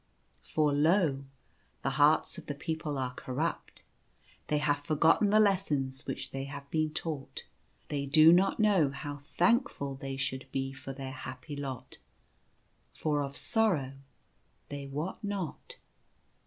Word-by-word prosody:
For 150 -2 +1
lo! 150 -2 +3 0.6
the 135 - +1
hearts 150 +2 +3
of - - -14
the 145 - -3
people 155 -1 -3
are 130 -1 -2
corrupt. 140 +6 -4 0.6
They 150 - +1
have 145 -1 +1
forgotten 160 +7 +3
the 215 +1 +5
lessons 150 -10 +1
which - - -5
they 135 0 -4
have 140 0 -8
been 155 -1 +1
taught. 155 -3 -5 0.4
They 140 -1 -2
do 155 +3 +7
not 190 +4 +3
know 200 -9 +4
how 145 +1 -6
thankful 175 - +1
they 135 0 -5
should 130 -1 -3
be 135 0 -2
for 135 - -7
their 135 -1 -6
happy 130 +2 -7
lot, 135 -3 -6 0.9
for 150 -2 0
of 140 0 -4
sorrow 175 - +1 0.8
they 140 -1 -6
wot 150 +10 -4
not. 200 -6 -4
145 Hz, 140 wpm, -31 LUFS, 135-165 Hz, 0.9 s, do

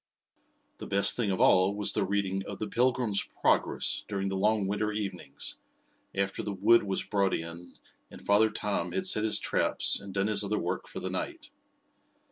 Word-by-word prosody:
The - - -7
best 100 0 +2
thing 115 -4 -1
of 95 - -1
all 95 +2 +4
was 105 -1 -1
the - - 0
reading 95 0 -1
of 100 - -6
"The 110 - -4
Pilgrim's 120 -2 +1
Progress" - - 0
during 100 -1 -2
the 95 - -3
long 105 +1 +1
Winter 105 +2 -1
evenings, 95 -9 -4 0.6
after 100 0 -1
the 100 -1 -4
wood 110 +5 +5
was 95 -2 -2
brought 100 -2 0
in 85 +1 -8 0.3
and - - -12
Father 105 +2 +3
Tom 100 -4 -3
had 95 - -1
set 105 - +5
his 110 -1 +2
traps - - +2
and 100 - -9
done 100 +1 0
his 105 -1 +1
other 105 +1 -1
work - - -3
for - - -7
the - - -4
night. - - -5
100 Hz, 185 wpm, -29 LUFS, 95-105 Hz, 0.6 s, wood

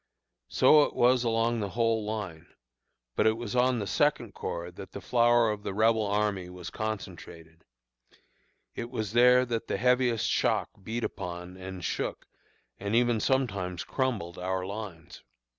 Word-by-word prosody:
"So 150 - +6
it - - 0
was 125 0 +4
along 115 0 +1
the 100 -2 -2
whole 115 +1 +1
line; 105 -7 -5 0.7
but - - +3
it 110 0 +2
was 120 -1 -5
on 125 0 +3
the 105 - -2
Second 95 - +1
Corps 85 +1 -5
that 95 +2 -11
the - - -5
flower 120 0 +3
of 105 -1 -5
the 95 - -5
Rebel 110 0 +3
army 100 -3 0
was 90 -1 -8
concentrated; 85 -6 -7 1.1
it 120 - -5
was 110 -3 -4
there 125 +1 +6
that 115 -2 -3
the - - -1
heaviest 125 0 +2
shock - - +1
beat 115 +4 -4
upon, 90 -1 -5
and 95 -1 -7
shook, - - -3 0.5
and 100 +3 -2
even 120 -1 +3
sometimes 100 -10 0
crumbled, 110 -11 -2
our 95 0 -2
lines. 95 -4 -8
110 Hz, 155 wpm, -29 LUFS, 95-120 Hz, 1.1 s, So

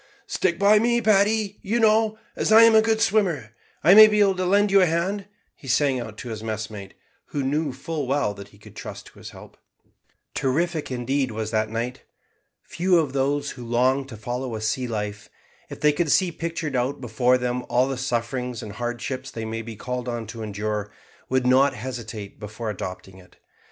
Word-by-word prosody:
"Stick 170 -3 0
by 205 +2 +5
me, 235 +2 +2
Paddy, 210 -1 +2
you 225 +5 -1
know; 220 0 +3 0.2
as - - -1
I'm 225 +1 +8
a 220 - +7
good 220 0 +1
swimmer 185 - +1 0.3
I 170 +5 +7
may 215 +1 +11
be 210 0 +1
able 200 -2 +4
to 185 -1 -1
lend 205 +2 +3
you 195 0 +6
a 180 - +4
hand," 190 +5 -1 0.3
he 135 - -14
sang 135 +1 +2
out 110 -3 -7
to 120 - -7
his 110 -2 -5
messmate, 110 -3 -6 0.3
who 145 - -3
knew 145 +2 0
full 145 +2 -4
well 135 -6 0
that 100 -1 -10
he 100 - -20
could 105 - -16
trust - - -8
to - - -16
his - - -9
help. - - -14 0.8
Terrific, 160 +4 -1
indeed, 130 +2 -1
was 110 -1 -4
that 110 -1 0
night. 120 +3 -4 0.6
Few 180 +1 +1
of 150 -5 0
those 140 +1 0
who 125 - -9
long 130 +3 +1
to 115 -5 -9
follow 120 +2 -4
a 110 - -5
sea 120 +4 -1
life, 105 -2 -5 0.4
if - - -8
they 150 0 +4
could 150 0 0
see 185 +2 +3
pictured 165 -3 -4
out 125 +3 -1
before 125 +1 +2
them 125 0 -2
all 125 +2 +3
the 135 - -2
sufferings 125 -1 -3
and 105 - -7
hardships 120 +4 -4
they 115 -1 -6
may 115 +1 -4
be 115 0 -8
called 125 +2 -4
on 120 -1 -4
to 115 +1 -8
endure, 105 0 -3 0.4
would 130 -1 +1
not 130 +3 +4
hesitate 110 -3 -7
before 110 +1 -5
adopting 95 -1 -7
it. 90 - -19
130 Hz, 195 wpm, -24 LUFS, 115-170 Hz, 0.8 s, may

